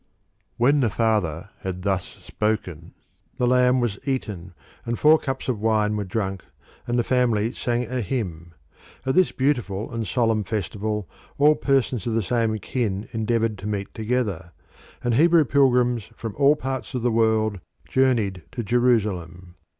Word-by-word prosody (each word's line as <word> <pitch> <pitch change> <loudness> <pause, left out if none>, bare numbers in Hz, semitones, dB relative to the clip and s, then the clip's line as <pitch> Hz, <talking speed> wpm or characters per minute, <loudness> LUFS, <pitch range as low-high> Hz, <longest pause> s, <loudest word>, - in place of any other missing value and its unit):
When 140 +5 +4
the 120 -5 +2
father 100 -6 0
had 90 -1 -5
thus 95 -2 0
spoken 90 -4 -4 0.4
the 125 - +1
lamb 125 +1 +4
was 115 -5 -1
eaten, 100 -10 -4 0.3
and 115 0 -2
four 155 +1 +6
cups 135 -1 -4
of 125 -5 -1
wine 105 -1 +2
were 105 - -1
drunk, 95 -1 -3 0.4
and 120 0 0
the 120 - +2
family 120 -2 +1
sang 120 0 -1
a 125 +1 -3
hymn. 85 -7 -4 0.5
At 130 - +1
this 185 +3 +4
beautiful 120 -8 -1
and 115 -2 -3
solemn 115 -4 +1
festival 105 0 -3 0.3
all 150 +2 +6
persons 135 -5 0
of 115 - 0
the 115 - +1
same 115 0 0
kin 105 -2 -3
endeavoured 115 -1 0
to 100 - -6
meet 100 -2 -3
together, 110 -7 -2 0.5
and 120 - +1
Hebrew 165 +4 +5
pilgrims 125 -4 +3
from 115 -3 -6
all 140 +1 +5
parts 130 -2 -5
of 125 - -2
the 120 - +2
world 110 -2 +2 0.3
journeyed 115 -8 +1
to 120 -2 -3
Jerusalem. 100 -7 0
115 Hz, 155 wpm, -24 LUFS, 100-125 Hz, 0.5 s, four